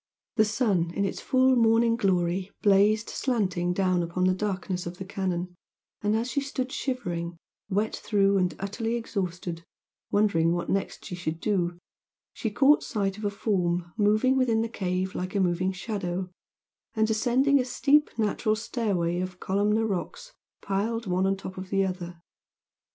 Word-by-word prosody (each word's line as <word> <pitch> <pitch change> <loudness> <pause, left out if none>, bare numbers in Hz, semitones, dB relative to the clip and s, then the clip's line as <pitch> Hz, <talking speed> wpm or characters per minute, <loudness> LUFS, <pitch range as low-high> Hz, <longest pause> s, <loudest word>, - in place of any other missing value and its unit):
The 220 -2 +5
sun 205 -6 +1
in 200 - +1
its 195 - -3
full 260 0 +3
morning 230 0 +4
glory 185 -3 +1
blazed 210 +2 +4
slanting 185 -8 0
down 185 -1 +1
upon 170 +2 -2
the 185 0 +4
darkness 185 -2 -3
of 175 +1 -7
the 190 - -6
canon, 185 -2 -3 0.5
and 210 +1 +1
as 235 +3 -1
she 280 - 0
stood 265 -2 -3
shivering, 175 -12 -3 0.3
wet 210 +2 0
through 200 -2 +2
and 180 -4 0
utterly 225 +4 -2
exhausted, 180 -7 -4 0.5
wondering 170 -6 +3
what 175 0 -2
next 195 0 -2
she - - -6
should 165 -2 -3
do, 175 -4 0 0.6
she 225 - -2
caught 275 +7 +5
sight 200 -4 -2
of 215 - -5
a - - +2
form 180 -4 -1
moving 215 +5 +3
within 235 -4 +2
the 230 - -3
cave 185 -3 -2
like 185 +2 -4
a - - +2
moving 185 0 +1
shadow, 185 -2 -4 0.6
and 220 0 +3
ascending 260 +5 +3
a - - +2
steep 285 +4 +3
natural 215 0 +1
stairway 200 -7 -1
of 185 0 -4
columnar 210 +3 +1
rocks 215 - -4 0.3
piled 220 +4 -1
one 185 0 +1
on 195 0 +1
top 190 -1 -7
of 185 0 -7
the 195 0 +2
other. 175 -2 -5
195 Hz, 160 wpm, -27 LUFS, 180-225 Hz, 0.6 s, The